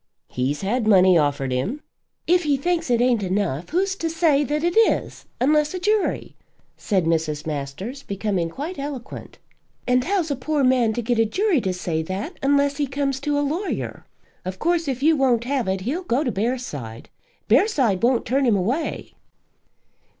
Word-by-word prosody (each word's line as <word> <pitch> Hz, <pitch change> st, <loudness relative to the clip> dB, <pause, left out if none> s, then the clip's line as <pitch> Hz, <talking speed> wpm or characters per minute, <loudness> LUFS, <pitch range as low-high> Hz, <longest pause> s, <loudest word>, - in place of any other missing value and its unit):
"He's 130 Hz, +4 st, -2 dB
had 220 Hz, +3 st, 0 dB
money 185 Hz, -3 st, +6 dB
offered 145 Hz, -4 st, +1 dB
him." 195 Hz, -, -2 dB, 0.4 s
"If 355 Hz, +1 st, +3 dB
he 295 Hz, -4 st, +1 dB
thinks 335 Hz, +1 st, -1 dB
it 240 Hz, -1 st, +3 dB
ain't 245 Hz, -3 st, +2 dB
enough, 185 Hz, -5 st, -2 dB
who's 380 Hz, +3 st, 0 dB
to 330 Hz, -, -2 dB
say 320 Hz, -3 st, +2 dB
that 295 Hz, +2 st, -2 dB
it 345 Hz, 0 st, 0 dB
is, 450 Hz, 0 st, +1 dB
unless 300 Hz, +5 st, +2 dB
a -, -, -3 dB
jury?" 420 Hz, +2 st, 0 dB, 0.4 s
said 190 Hz, -5 st, 0 dB
Mrs. 160 Hz, -2 st, -1 dB
Masters, 155 Hz, -, -5 dB
becoming 195 Hz, -6 st, -2 dB
quite 300 Hz, -, -6 dB
eloquent. 275 Hz, -3 st, -7 dB, 0.5 s
"And 250 Hz, 0 st, +2 dB
how's 350 Hz, -2 st, 0 dB
a -, -, 0 dB
poor 285 Hz, +3 st, -1 dB
man 250 Hz, -3 st, +3 dB
to 240 Hz, -, -3 dB
get 235 Hz, 0 st, 0 dB
a 225 Hz, -, +4 dB
jury 365 Hz, -, +1 dB
to 190 Hz, -, -1 dB
say 175 Hz, -3 st, -2 dB
that, 195 Hz, -, -5 dB
unless 280 Hz, 0 st, +2 dB
he 290 Hz, -2 st, 0 dB
comes 275 Hz, 0 st, -2 dB
to 290 Hz, +1 st, -1 dB
a 290 Hz, -, +1 dB
lawyer? 340 Hz, +8 st, -3 dB, 0.4 s
Of 185 Hz, +1 st, -5 dB
course, 335 Hz, -, 0 dB
if 265 Hz, -1 st, -3 dB
you 320 Hz, +1 st, +5 dB
won't 255 Hz, -5 st, +2 dB
have 260 Hz, -2 st, -1 dB
it, 190 Hz, 0 st, -1 dB
he'll 275 Hz, -, -2 dB
go 285 Hz, -5 st, 0 dB
to 250 Hz, -, -1 dB
Bearside. 195 Hz, -, -4 dB, 0.4 s
Bearside 260 Hz, -, +3 dB
won't 240 Hz, 0 st, +2 dB
turn 270 Hz, +2 st, +1 dB
him 225 Hz, -, +4 dB
away." 240 Hz, -, -2 dB
255 Hz, 180 wpm, -23 LUFS, 190-300 Hz, 0.5 s, money